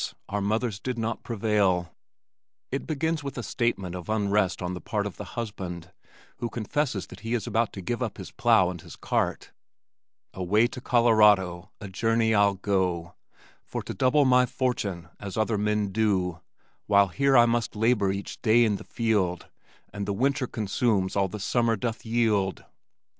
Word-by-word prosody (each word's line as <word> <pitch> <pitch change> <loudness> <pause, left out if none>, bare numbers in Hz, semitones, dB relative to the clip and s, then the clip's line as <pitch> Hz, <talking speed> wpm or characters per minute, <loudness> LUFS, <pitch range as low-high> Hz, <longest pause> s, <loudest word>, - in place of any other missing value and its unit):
our 105 0 -1
mothers 110 +1 -1
did 125 +1 -4
not 115 0 -2
prevail. 100 -6 0 0.8
It 135 - -3
begins 160 0 -1
with 140 -1 -6
a 125 - -3
statement 100 -5 -1
of 90 +2 -7
unrest 100 -3 +1
on 90 0 -3
the 90 - -6
part 105 -3 -2
of 105 - -6
the - - -5
husband 90 -6 -5 0.5
who 120 - -3
confesses 115 -1 -2
that 95 - -12
he 115 +5 -2
is 115 - -2
about 115 -1 0
to 95 - -6
give 120 +6 -3
up 115 -5 -3
his - - -8
plow 90 -1 +3
and 85 -3 -8
his - - -11
cart - - -2 0.8
Away 100 +5 +2
to 125 +1 -5
Colorado 105 -7 +4
a 105 - -7
journey 115 +3 +1
I'll 100 -1 +4
go, 90 -3 -1 0.5
For - - -5
to - - -5
double 140 +3 +3
my 125 -1 +5
fortune 100 -11 -2
as 100 0 -6
other 110 -1 +1
men 105 -1 0
do, 95 -5 0 0.5
While 100 -1 +5
here 135 +6 +3
I 120 - +7
must 115 -1 0
labor 105 -3 +2
each 100 +1 -6
day 120 +1 +5
in 105 -3 +1
the - - -10
field 100 -7 -1 0.4
And 100 0 -4
the 100 - 0
winter 130 +3 0
consumes 105 -2 0
all 100 -1 +2
the 105 +3 -7
summer 115 +3 +1
doth 115 +1 -4
yield. 110 -5 +1
105 Hz, 175 wpm, -26 LUFS, 95-120 Hz, 0.8 s, I